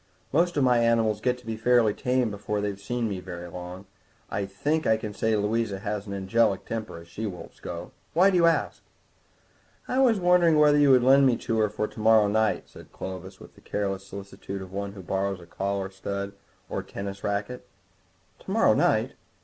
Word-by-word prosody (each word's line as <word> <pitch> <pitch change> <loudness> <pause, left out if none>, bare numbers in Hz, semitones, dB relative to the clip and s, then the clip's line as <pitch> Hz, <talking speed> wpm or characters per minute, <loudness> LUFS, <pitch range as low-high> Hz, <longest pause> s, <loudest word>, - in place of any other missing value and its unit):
Most 170 +2 +2
of 140 - +3
my 125 -2 +4
animals 115 -2 +2
get 125 +1 +1
to 125 - -18
be 115 0 -3
fairly 115 -1 +3
tame 125 -1 0
before 105 +1 -3
they've 100 -1 -4
been 120 0 -1
with - - +1
me 95 - -3
very 90 -1 -7
long; 90 +2 -8 0.5
I 100 0 -2
think 150 +11 -1
I 110 - +4
can 105 -1 -6
say 110 +2 +1
Louisa 105 0 0
has 105 +1 -4
an 100 - -5
angelic 100 +1 +1
temper, 110 -6 -5
as 85 0 -12
she 105 +6 -5
wolves 90 -3 -9
go. - - -7 0.2
Why 190 +4 +6
do - - 0
you 170 -1 +5
ask?" 165 - 0 1.1
"I 255 - 0
was 240 -6 +4
wondering 175 -3 +4
whether 150 -1 +5
you 145 -1 +5
would 130 -2 +6
lend 135 +1 +6
her 120 - +1
to 115 - -3
me 110 -1 +3
for 105 +1 -2
to - - -12
morrow 110 -1 +5
night," 110 +1 +1
said - - -15
Clovis, 95 0 -7
with - - -14
the - - -20
careless 95 -1 -3
solicitude 100 0 -7
of 95 - -11
one 100 0 -4
who 95 -2 -10
borrows 95 +1 -1
a 85 - -13
collar 100 +1 -3
stud 100 +1 -4 0.4
or - - -3
a - - -6
tennis 100 0 -7
racquet. 100 +5 -3 0.7
"To - - -13
morrow - - +4
night?" - - +2
105 Hz, 210 wpm, -26 LUFS, 100-125 Hz, 1.1 s, Why